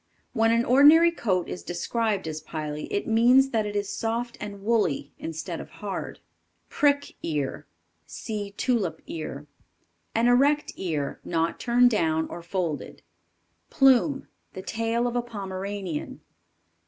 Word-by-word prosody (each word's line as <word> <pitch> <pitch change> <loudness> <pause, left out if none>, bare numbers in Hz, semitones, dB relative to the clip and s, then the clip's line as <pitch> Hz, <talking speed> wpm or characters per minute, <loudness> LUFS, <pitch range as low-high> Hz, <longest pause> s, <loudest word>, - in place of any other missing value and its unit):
When 225 -1 +3
an 230 +1 +2
ordinary 300 +6 +7
coat 185 - -1
is - - -6
described 205 +2 -2
as 155 0 -4
pily, 150 -1 -5
it 205 - -1
means 250 +4 +5
that 220 -2 0
it 205 - -5
is 205 -1 -2
soft 235 +1 -2
and 200 -1 -7
woolly, 205 -11 0
instead 165 +1 -5
of - - -11
hard. 200 -2 -6 0.5
Prick 285 -1 +1
Ear, 145 -4 -3 0.4
(See 210 -3 -5
Tulip 215 -11 0
ear). 150 -3 -6 0.7
An 230 +1 +3
erect 280 +5 +3
ear; 155 -6 -3
not 165 -1 -1
turned 245 0 +4
down 160 -6 +1
or 175 - -7
folded. 170 -3 -4 0.7
Plume. 270 0 +3 0.3
The 190 - -7
tail 230 +2 -1
of 245 0 -2
a 245 - +2
Pomeranian. 195 -6 -5
210 Hz, 135 wpm, -26 LUFS, 170-240 Hz, 0.7 s, ordinary